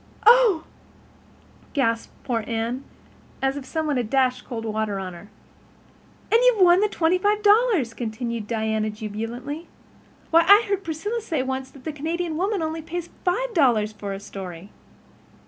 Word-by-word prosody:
'" - - -22
"Oh," 455 -8 +6 1.1
gasped 230 -5 0
poor 230 -3 -1
Anne, 235 +3 -2 0.6
as 270 0 0
if 285 -2 -6
some 320 +2 -2
one 295 -3 0
had 240 -3 -2
dashed 255 -1 +1
cold 230 -3 -5
water 215 -2 -2
on 185 -2 -5
her. 190 +4 -12 1.0
"And 455 - +6
you've - - +4
won 350 0 +6
the 420 +1 +2
twenty 350 -1 +1
five 415 +2 +1
dollars," 410 - +4
continued 230 -1 -4
Diana 220 -1 -1
jubilantly. 225 +9 -6 0.6
"Why, 330 +1 +7
I 410 +3 +8
heard 395 -1 -1
Priscilla 410 +9 -3
say 320 -10 -2
once 265 0 -3
that 270 -2 -16
the 315 - -4
Canadian 325 +3 -3
Woman 380 +1 0
only 320 +1 -3
pays 340 +2 -6
five 470 +7 0
dollars 235 - +3
for 205 -1 -6
a 195 - -4
story!" 190 -2 -9
270 Hz, 165 wpm, -24 LUFS, 225-355 Hz, 1.1 s, I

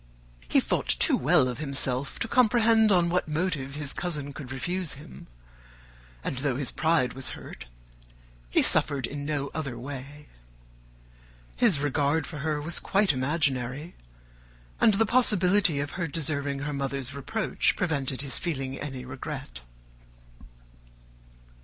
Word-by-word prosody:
He - - +5
thought - - -1
too - - +5
well 145 0 +4
of 125 +1 -4
himself 135 -2 +1
to - - -1
comprehend 225 -2 +4
on 175 -3 +4
what 180 0 0
motive 150 -4 -2
his 145 -2 -4
cousin 150 -5 -2
could 135 -2 -8
refuse 165 +5 -2
him; 150 +4 -12 1.0
and 130 - -3
though 135 -2 0
his 130 -4 -2
pride 160 -6 +1
was 135 0 -2
hurt, - - -10 0.8
he - - +3
suffered 140 -4 +2
in 145 +2 -6
no 145 -2 -2
other 140 -6 -4
way. 140 +3 -8 1.3
His 225 - +3
regard 145 +1 +1
for 150 -1 -7
her 150 +1 -1
was 160 +3 -2
quite 195 -5 +2
imaginary; 135 +1 -1 0.9
and 215 - +5
the 225 +2 +3
possibility 200 - +3
of 145 0 -3
her 175 -2 -3
deserving 140 -2 -2
her 145 0 -3
mother's 135 -1 -2
reproach 165 - 0
prevented 140 -6 +1
his 140 - -1
feeling 135 -5 -3
any 130 -3 -6
regret. 130 - -6
145 Hz, 135 wpm, -27 LUFS, 135-170 Hz, 1.3 s, He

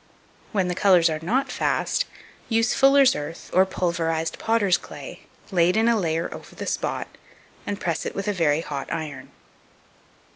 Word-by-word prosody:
When 190 -3 +1
the 180 - -1
colours 180 -3 +4
are 155 - -2
not 245 +11 0
fast, - - 0 0.4
use 230 -1 +2
fuller's 275 -1 +5
earth 150 +3 -7
or 185 +1 +5
pulverized 165 -3 -1
potter's 220 -5 +2
clay, - - -9 0.2
laid 180 +1 +3
in 225 +1 +3
a 235 - +4
layer 165 -4 0
over - - -11
the - - -6
spot, - - -2 0.6
and 205 0 -3
press 170 -3 -2
it - - -5
with 195 - -3
a 210 - +1
very 160 -4 +2
hot 140 -4 -5
iron. 145 -5 -5
180 Hz, 160 wpm, -24 LUFS, 165-220 Hz, 0.6 s, fuller's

